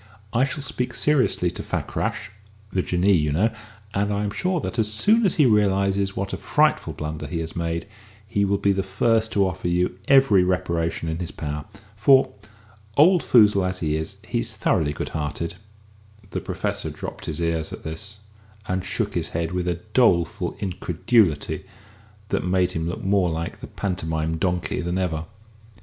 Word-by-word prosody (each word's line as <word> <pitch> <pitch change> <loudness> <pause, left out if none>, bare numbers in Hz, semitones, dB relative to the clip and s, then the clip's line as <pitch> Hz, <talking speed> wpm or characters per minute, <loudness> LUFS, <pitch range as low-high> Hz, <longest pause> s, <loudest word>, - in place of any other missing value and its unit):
I 125 +3 +4
shall 140 +1 -5
speak 125 -2 -3
seriously 130 - +2
to - - -6
Fakrash - - -3 0.4
(the 95 - +1
Jinnee, 90 +3 +2
you 75 -4 +2
know), 105 +10 +2 0.4
and 100 0 0
I 100 0 0
am 105 - -1
sure 180 - 0
that, 120 - -4
as 105 -1 +1
soon 210 - +4
as 180 - 0
he 150 - +5
realises 100 -3 +2
what 100 0 -3
a - - -2
frightful - - +2
blunder 75 -1 -5
he 85 +3 -3
has 80 0 -6
made, 85 -1 -2 0.4
he 100 -1 +1
will 100 0 +2
be 100 - +2
the 95 0 +1
first 110 +4 +1
to 100 -1 +3
offer 95 -1 -4
you 90 +1 0
every 135 -9 +6
reparation 85 -3 -1
in 80 0 -2
his 90 - -3
power. 75 0 -5 0.3
For, 130 +6 +5 0.6
old 175 +4 +6
foozle 105 -5 +5
as 95 0 -5
he 75 -2 0
is, 80 0 -4
he's - - -2
thoroughly 75 -2 +1
good - - -4
hearted." 80 +3 -3 0.7
The - - -3
Professor - - -3
drooped - - -7
his 75 - -4
ears 85 -1 -1
at - - -8
this, 100 +6 -6 0.5
and 95 0 -1
shook - - -2
his - - -2
head 85 -1 -1
with 90 0 -2
a 85 -1 -1
doleful 85 -10 +2
incredulity 90 -1 +1 0.7
that - - 0
made 90 0 +2
him 80 -1 -2
look 90 - -5
more 95 -2 +2
like 80 +1 -4
the - - -7
Pantomime 80 -4 -2
Donkey 90 0 -1
than 85 +1 -2
ever. 85 -4 -1
95 Hz, 175 wpm, -24 LUFS, 85-105 Hz, 0.7 s, every